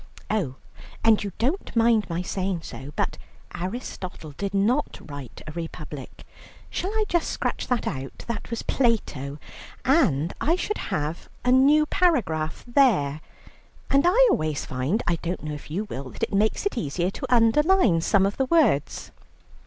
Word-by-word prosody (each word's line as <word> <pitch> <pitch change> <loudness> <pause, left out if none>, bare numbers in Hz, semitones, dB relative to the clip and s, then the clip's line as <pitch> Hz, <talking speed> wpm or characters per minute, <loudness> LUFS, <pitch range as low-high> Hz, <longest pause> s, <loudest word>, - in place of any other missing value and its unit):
Oh, 180 -12 0 0.5
and 225 -2 +5
you 200 - -4
don't 275 +9 -1
mind 225 -3 +3
my 170 +1 -2
saying 185 -2 -2
so, 135 +2 -8
but - - -1 0.3
Aristotle 185 - -5
did 195 +7 -4
not 215 +9 +1
write 145 -5 -9
a 155 - -6
republic. 155 -4 -7 0.5
Shall 370 - -2
I 435 +1 0
just 345 -4 +1
scratch - - -2
that 250 -2 0
out? 135 -3 -5
That 235 -2 -4
was 230 - -3
Plato. 150 - 0 0.5
And 175 - +3
I 325 +4 +3
should 425 +3 -2
have 155 +2 -3 0.2
a 250 - +4
new 285 +4 +6
paragraph 230 - +1
there; 215 - +3 0.7
and 275 +2 +4
I - - +6
always 155 -2 0
find, 135 - -1
I 170 - +1
don't 170 +1 -4
know 155 0 -4
if 150 - -9
you 180 +8 -2
will, 140 -10 -6
that - - -8
it - - -1
makes 215 - +1
it 405 -12 0
easier 175 +3 -1
to 260 +4 -6
underline 240 - +4
some 195 +3 +3
of 200 - -1
the 265 - +2
words." 255 - +2
200 Hz, 160 wpm, -25 LUFS, 155-260 Hz, 0.7 s, new